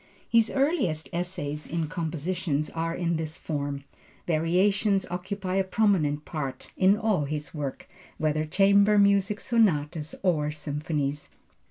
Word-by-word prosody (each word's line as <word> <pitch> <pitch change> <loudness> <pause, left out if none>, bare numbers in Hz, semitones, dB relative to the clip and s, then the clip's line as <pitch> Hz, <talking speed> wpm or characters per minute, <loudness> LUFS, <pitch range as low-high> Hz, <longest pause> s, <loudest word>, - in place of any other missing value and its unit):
His 230 -1 +4
earliest 270 - 0
essays 170 -4 -3
in 165 -1 -2
composition 165 -1 -2
are 165 0 -2
in 170 -2 0
this 160 -1 -4
form. 145 -2 -3 0.4
Variations 190 +5 +2
occupy 185 +1 -3
a 195 - +3
prominent 185 -8 +1
part 135 -5 -5
in 195 +2 +4
all 210 -9 +1
his 150 -1 -4
works, 145 -4 -5 0.3
whether 155 0 0
chamber 200 +5 +4
music, 200 +1 +3
sonatas 160 -9 +1
or 155 -5 +2
symphonies. 150 -1 -3
165 Hz, 125 wpm, -27 LUFS, 150-195 Hz, 0.4 s, His